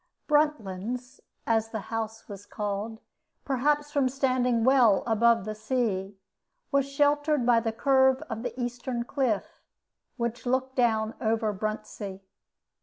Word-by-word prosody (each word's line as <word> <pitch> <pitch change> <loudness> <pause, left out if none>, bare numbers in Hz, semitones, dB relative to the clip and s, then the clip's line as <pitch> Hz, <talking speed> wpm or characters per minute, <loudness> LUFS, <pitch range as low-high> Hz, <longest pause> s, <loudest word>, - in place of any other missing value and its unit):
"Bruntlands," 250 -4 0 0.3
as 225 -1 +1
the 220 - -4
house 225 0 -4
was 205 -1 -10
called, 210 +2 -4 0.4
perhaps 290 +2 +1
from 280 -3 +2
standing 255 -3 +1
well 245 -6 +5
above 230 -2 +3
the 215 - -3
sea, 215 -4 -2 0.5
was 280 -1 +2
sheltered 290 -1 +2
by 235 -1 +5
the 225 0 -1
curve 265 +2 +3
of 225 -2 -6
the 245 +1 -5
eastern 245 0 -3
cliff, 245 -5 -2 0.6
which 235 +1 -3
looked 260 +1 0
down 225 -3 +2
over 220 -2 +1
Bruntsea. 210 -1 -5
235 Hz, 125 wpm, -27 LUFS, 220-265 Hz, 0.6 s, well